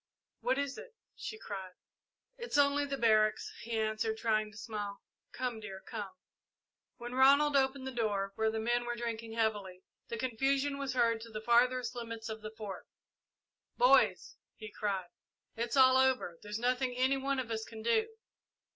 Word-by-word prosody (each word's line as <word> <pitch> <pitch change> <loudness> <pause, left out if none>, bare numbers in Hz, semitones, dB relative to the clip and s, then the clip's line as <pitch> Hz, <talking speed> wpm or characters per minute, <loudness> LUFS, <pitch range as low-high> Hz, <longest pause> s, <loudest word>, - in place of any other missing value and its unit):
"What 255 +2 +1
is 280 -1 -2
it?" 485 -2 -12 0.2
she 435 - -6
cried. 195 - -7 0.6
"It's 475 -10 -3
only 285 0 +4
the 275 -1 -3
barracks," 215 -3 +3
he 230 0 -3
answered, 220 0 -1
trying 215 -1 +1
to 210 - -14
smile. 205 -3 -5 0.3
"Come, 245 -3 -3
dear, 200 -3 -8
come!" 210 -1 -6 0.9
When 240 0 -7
Ronald 280 +3 +5
opened 265 0 +2
the 265 - -3
door, 205 -5 -1
where 220 +2 +1
the 220 - -3
men 240 +2 0
were 240 0 -2
drinking 230 -1 -4
heavily, 205 -5 -1 0.2
the 230 - -4
confusion 270 +4 0
was 275 -2 -2
heard 230 -2 +2
to 230 - -9
the 215 -1 -5
farthest 245 +3 +3
limits 230 -2 -6
of 220 0 -6
the 215 - -6
Fort. 215 -3 -8 0.9
"Boys," - - +4 0.2
he 215 -1 -9
cried, 195 -4 -2 0.5
"it's 235 +4 -2
all 260 -1 +7
over 260 -10 +2
there's 210 0 -5
nothing 250 +1 0
any 260 +2 +3
one 275 +1 -1
of 250 -3 -3
us 220 -1 -2
can 220 -1 -9
do!" 440 - +2
235 Hz, 170 wpm, -33 LUFS, 215-265 Hz, 0.9 s, all